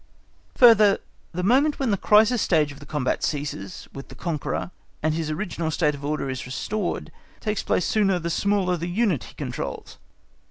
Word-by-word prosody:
Further, 215 -5 +7 0.3
the 180 +1 -3
moment 270 +9 +3
when 265 -5 0
the - - +3
crisis 215 +4 +4
stage 155 -4 +2
of 140 - -12
the 145 - -13
combat 145 -4 -1
ceases 140 - -4
with 135 - -8
the - - -12
conqueror, 170 0 -3 0.3
and 155 0 +2
his 160 -1 -2
original 165 0 -3
state 155 -1 +1
of 140 0 -9
order 150 -1 -2
is 130 -1 -4
restored, 200 +9 -3 0.3
takes 210 -2 -2
place 180 - 0
sooner 195 -4 +2
the 170 -1 -3
smaller 195 -1 +1
the 170 +1 -4
unit 190 - +1
he - - -14
controls. - - -6
175 Hz, 175 wpm, -24 LUFS, 150-210 Hz, 0.3 s, Further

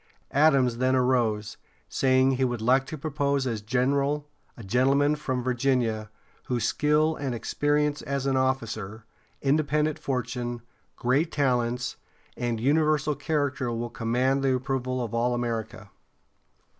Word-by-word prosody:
Adams 135 -5 +3
then 130 +1 +2
arose, 120 -5 +1 0.3
saying 130 0 +3
he 130 0 0
would 120 -2 0
like 130 +4 +2
to 155 - -6
propose 140 -2 -1
as 115 -4 -2
general 140 +6 0 0.3
a 115 - -9
gentleman 135 +7 +2
from 130 -4 -3
Virginia, 120 -4 0 0.4
whose 120 -2 -1
"skill 150 +1 +2
and 135 -4 -3
experience 145 +4 0
as 140 -1 -3
an 135 -1 +1
officer, 115 -5 -2 0.4
independent 150 +1 +1
fortune, 120 -2 -3 0.3
great 140 +7 +1
talents, 125 -3 0 0.4
and 120 -2 -2
universal 150 +3 +2
character 145 -5 -1
will 120 0 -3
command 125 +4 0
the 135 -1 +2
approval 130 -1 -2
of 115 - -6
all 120 +1 +1
America." 115 -4 -4
130 Hz, 130 wpm, -26 LUFS, 120-140 Hz, 0.4 s, Adams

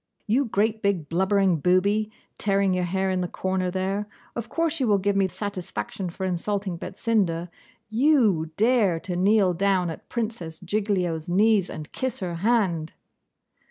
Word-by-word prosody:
'You 245 +6 +2
great 220 0 0
big 185 -7 0
blubbering 190 +1 +2
booby, 200 +6 +2 0.3
tearing 195 -2 +2
your 180 -1 0
hair 190 +2 0
in 185 -1 0
the 180 - -1
corner 185 0 -1
there; 195 +3 -2 0.3
of 235 -1 -5
course 330 -1 0
you 260 - +1
will 205 -2 +4
give 200 +1 0
me 195 -1 +3
satisfaction 190 0 -5
for 190 +3 -5
insulting 190 +1 -2
Betsinda. 180 -3 -1 0.4
YOU 220 - +3
dare 215 -6 +3
to 180 - -4
kneel 195 0 +3
down 185 -1 +1
at - - -10
Princess 215 -9 -4
Giglio's 180 -4 -1
knees 200 +1 +3
and 155 0 -8
kiss 260 -2 -3
her 175 -3 -3
hand! 185 -6 +1
195 Hz, 155 wpm, -25 LUFS, 180-215 Hz, 0.4 s, will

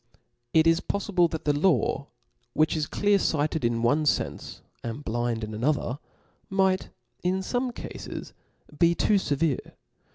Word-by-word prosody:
^' - - -27 0.4
It 160 0 +5
is 165 0 +4
poffible 185 -4 +1
that 160 - -5
the 145 - +3
law, 145 -3 +2 0.5
which 155 +1 +2
is 155 -2 -1
clear 205 -1 +2
fighted 155 -3 0
in 115 0 +1
one 145 +6 +3
fenfe, - - -1 0.2
and 120 +5 -5
blind 120 0 -1
in 110 0 -5
another, 130 +3 0 0.5
might, 190 -1 +1 0.3
in 185 +2 0
fom^ 245 +6 -1
cafes, - - -7 0.5
be 170 0 +5
too 205 +2 +3
fevere. 145 -4 -1
155 Hz, 150 wpm, -27 LUFS, 130-185 Hz, 0.5 s, It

